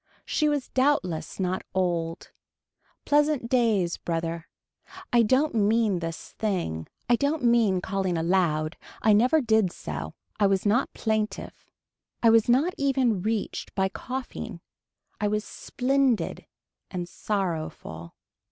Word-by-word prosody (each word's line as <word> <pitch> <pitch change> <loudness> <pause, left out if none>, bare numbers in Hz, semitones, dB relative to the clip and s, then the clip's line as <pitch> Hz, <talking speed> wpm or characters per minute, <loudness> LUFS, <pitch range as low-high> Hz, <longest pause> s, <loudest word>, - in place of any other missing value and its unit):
She 305 -1 +1
was 290 -3 -1
doubtless 255 - 0
not 185 0 -1
old. 170 -2 -1 0.7
Pleasant 295 -4 +2
days 220 -9 +2
brother. 165 0 -3 0.7
I 240 - +6
don't 260 +7 +2
mean 215 -2 +2
this 165 -1 -6
thing. 175 - -2 0.2
I 240 - +5
don't 285 +3 0
mean 230 -6 +3
calling 190 -2 -1
aloud, 165 -2 +1 0.3
I 215 - +5
never 250 +9 +4
did 220 -6 +2
so, 75 - -6 0.2
I 205 - +5
was 195 0 +1
not 230 +6 +2
plaintive. 215 -1 -3 0.5
I 230 - +7
was 225 0 +4
not 285 +9 +3
even 260 -8 +2
reached 215 +1 -3
by 190 -1 +1
coughing. 255 +5 -6 0.6
I 210 - +1
was 210 +1 -1
splendid 265 -2 0 0.4
and 180 -2 -4
sorrowful. 160 - -4
210 Hz, 125 wpm, -26 LUFS, 175-245 Hz, 0.7 s, I